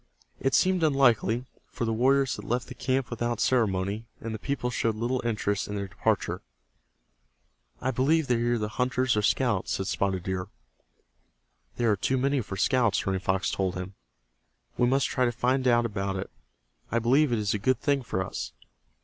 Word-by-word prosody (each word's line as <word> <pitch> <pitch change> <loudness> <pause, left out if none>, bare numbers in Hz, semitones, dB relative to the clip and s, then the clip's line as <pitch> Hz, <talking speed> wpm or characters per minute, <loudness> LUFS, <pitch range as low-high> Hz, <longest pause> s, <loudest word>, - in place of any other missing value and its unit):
It 135 - +1
seemed 185 -1 +3
unlikely, 125 -6 +3 0.2
for 125 - -3
the 115 - 0
warriors 130 +3 +3
had - - -8
left 120 0 -2
the - - -6
camp 130 +1 -1
without 120 -1 -2
ceremony, 105 -2 +1
and 115 0 -5
the 110 - -5
people 125 -1 -2
showed 115 -2 0
little 120 +3 -1
interest 105 -3 -1
in 105 - -4
their 100 -1 -3
departure. - - -1 1.4
"I 130 - 0
believe 145 +6 +2
they 120 -3 +1
are 120 0 +2
either 105 -2 -1
hunters 125 +2 0
or 105 - +2
scouts," 105 -3 +1
said 95 - -2
Spotted 95 -2 -1
Deer. 95 0 -3 1.3
"There 120 -2 +2
are - - +3
too 130 +7 0
many 135 +1 +1
for 100 -3 -6
scouts," 115 +1 +2
Running 95 -1 0
Fox 95 0 0
told 95 -2 -1
him. 90 +1 -5 0.8
"We 120 - +2
must 135 +2 +2
try 130 - +1
to 120 - +1
find 130 +2 +1
out 120 -1 +4
about 100 -3 -2
it 95 -8 -5 0.6
I 115 - +1
believe 130 +5 +3
it 120 - +2
is 105 -1 0
a 105 - -1
good 125 +4 +1
thing 140 0 +1
for 95 -6 -2
us. - - -5
120 Hz, 185 wpm, -27 LUFS, 100-130 Hz, 1.4 s, out